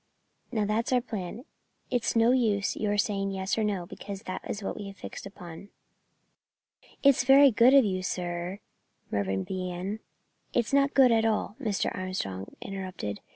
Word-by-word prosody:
Now 215 -4 0
that's 215 +4 0
our 250 - +4
plan. 220 0 -6 0.5
It's 245 -2 0
no 230 +1 +5
use 215 -6 +1
your 205 -1 0
saying 200 -1 0
yes 190 0 -1
or 220 - 0
no, 200 -4 -1
because 200 +3 -8
that's 200 +2 -5
what - - -3
we 205 - -6
have 195 -1 -10
fixed - - -8
upon." 180 0 -11 1.3
"It's 275 -3 +5
very 275 +1 +7
good 240 +5 +6
of 270 -4 +7
you, 185 -2 -1
sir 175 +1 -3 0.2
" - - -41
Mervyn 95 -1 -1
began. 185 +2 -4 0.5
"It's 240 +2 0
not 280 0 +3
good 260 -3 +7
at 225 -1 +3
all," 220 -1 0
Mr. 215 -6 -1
Armstrong 100 - -4
interrupted. 185 - -5
205 Hz, 160 wpm, -28 LUFS, 185-230 Hz, 1.3 s, very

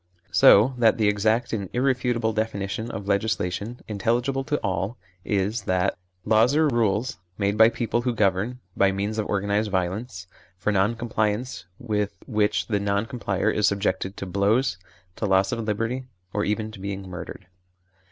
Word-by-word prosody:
So 115 +7 +6
that 115 -2 +4
the 110 -2 +2
exact 110 +4 +1
and 100 -4 -2
irrefutable 125 -3 +1
definition 110 0 -2
of 100 -3 -6
legislation, 105 +2 -1
intelligible 120 +6 0
to 150 +1 0
all, 95 +3 -2 0.3
is 100 +3 0
that: 95 +1 +1 0.3
Laws 110 +5 +4
are 155 0 +4
rules, 115 -2 0 0.2
made 100 0 0
by 110 +1 +7
people 120 0 -1
who 120 -1 -1
govern 105 +4 +1 0.2
by 100 0 +4
means 100 +3 -2
of 105 - -1
organised 100 +1 0
violence, 95 +2 -2 0.3
for 95 +3 0
non 100 +3 +2
compliance 115 -2 -2
with 105 -3 -2
which 105 -3 +1
the 105 -3 0
non 100 +1 0
complier 110 -5 -1
is 105 -1 +2
subjected 100 -1 -1
to - - -4
blows, 100 +3 +1 0.4
to 105 - -1
loss 95 0 +3
of 120 - -2
liberty, 115 +5 -2 0.3
or 105 - 0
even 110 +1 -1
to 110 - -11
being 100 0 -5
murdered. 90 +1 -8
105 Hz, 160 wpm, -25 LUFS, 100-115 Hz, 0.4 s, by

